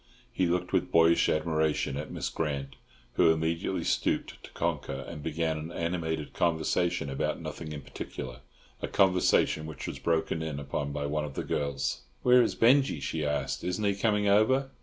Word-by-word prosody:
He 90 - +1
looked 90 +1 -1
with - - +1
boyish 85 0 +5
admiration 80 -3 +1
at 75 +2 -5
Miss - - -3
Grant, 70 -4 -3 0.4
who - - +6
immediately 80 +1 -1
stooped - - -1
to - - -10
conquer, 70 0 -2
and 75 -3 -7
began 80 0 -1
an 80 +2 -6
animated 85 -3 -2
conversation 85 0 +1
about 70 -1 -2
nothing 80 -2 -6
in 75 -1 -5
particular—a 60 -2 -8
conversation 90 -4 +3
which 80 - -7
was - - -5
broken 80 -1 0
in 80 -3 -3
upon 70 0 -3
by 70 0 -3
one 75 +1 -1
of 75 -2 -6
the - - -2
girls. 70 -1 -2 0.2
"Where 125 0 +7
is 115 - +1
Binjie?" 130 - +4
she 80 +3 -2
asked. 75 -1 -1
"Isn't 90 +4 -2
he 100 - +3
coming 105 0 +1
over?" 130 +7 +3
80 Hz, 170 wpm, -29 LUFS, 75-90 Hz, 0.4 s, Where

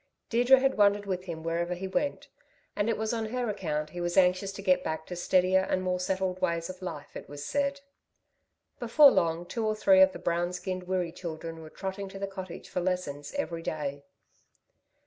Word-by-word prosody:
Deirdre 245 +3 +6
had 270 -2 +1
wandered 205 0 +4
with 185 -1 -3
him 165 -3 -6
wherever 170 +2 -1
he 190 +2 -5
went, 270 +9 -2 0.5
and 205 +2 0
it 230 - +1
was 220 +1 -1
on 225 -1 -1
her 245 +2 -2
account 155 -6 -3
he 175 - -5
was 175 +1 -2
anxious 185 +1 +4
to 195 0 -8
get 185 -2 +3
back 160 0 -3
to 180 - -6
steadier 185 +1 +3
and 185 - +1
more 180 0 0
settled 185 0 -1
ways 170 +1 0
of 185 - -14
life, 165 -5 -7
it - - -8
was 145 0 -7
said. 280 0 -1 1.0
Before 275 +4 +7
long 165 +1 +1
two 230 +6 -3
or 215 0 +1
three 190 -3 +5
of 190 0 +7
the - - -8
brown 175 +1 -1
skinned 180 0 -4
Wirree 180 -2 -1
children 165 -1 -7
were 155 - -10
trotting 195 +3 -5
to 195 - -9
the 200 - -2
cottage 190 -2 -8
for 180 - -2
lessons 175 - -3
every 170 -13 -2
day. 145 -3 -3
185 Hz, 205 wpm, -29 LUFS, 170-200 Hz, 1.0 s, Before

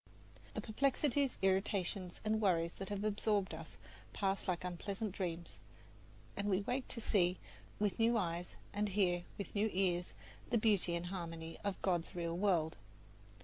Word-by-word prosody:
The - - -1
perplexities, 275 +3 +2
irritations 190 -1 +1
and 220 0 +2
worries 170 -4 +3
that 195 - -4
have 205 0 -2
absorbed 205 -3 +1
us 160 0 -8 0.4
pass 195 -1 0
like 180 -2 0
unpleasant 195 +4 -3
dreams, 175 -3 -4 0.8
and 200 0 -1
we 190 0 +3
wake 250 +5 -1
to 235 - -5
see 185 -5 +3 0.4
with 205 0 0
new 230 +1 +5
eyes 175 -3 -2 0.2
and 205 +1 +1
hear 180 -3 +2
with 200 - -5
new 215 +1 +2
ears 180 -2 +1 0.4
the 235 - +3
beauty 205 -6 +3
and 170 +1 -2
harmony 165 -3 -5
of 200 -2 -1
God's 175 -3 +1
real 170 -1 -1
world. 175 -4 +2
195 Hz, 150 wpm, -37 LUFS, 175-210 Hz, 0.8 s, new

